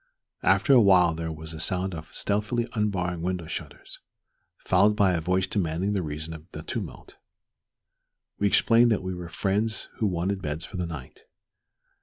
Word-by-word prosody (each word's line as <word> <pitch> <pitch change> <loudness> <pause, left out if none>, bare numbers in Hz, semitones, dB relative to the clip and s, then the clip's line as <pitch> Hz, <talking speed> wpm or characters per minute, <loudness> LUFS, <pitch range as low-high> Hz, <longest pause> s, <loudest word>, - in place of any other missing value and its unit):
After 140 - +4
a 125 - +8
while 90 -5 +5
there 80 0 -4
was 80 +1 -8
a 80 - -7
sound 95 +2 -1
of 80 -1 -8
stealthily 105 +4 -1
unbarring 90 -6 -1
window 90 -1 -2
shutters, - - -7 0.6
followed 100 +3 +3
by 100 -3 +4
a 85 - 0
voice 90 +3 +1
demanding 95 +1 -1
the 100 - 0
reason 75 0 -5
of 80 +1 -11
the 75 - -7
tumult. - - -6 1.2
We 100 - +3
explained 115 +3 +5
that 105 - +1
we 95 0 -3
were 90 -1 -7
friends 105 +6 -1
who 110 - +1
wanted 95 +2 -1
beds 75 0 -3
for 100 - -8
the 90 -1 -2
night. 75 -6 -9
90 Hz, 170 wpm, -26 LUFS, 80-100 Hz, 1.2 s, a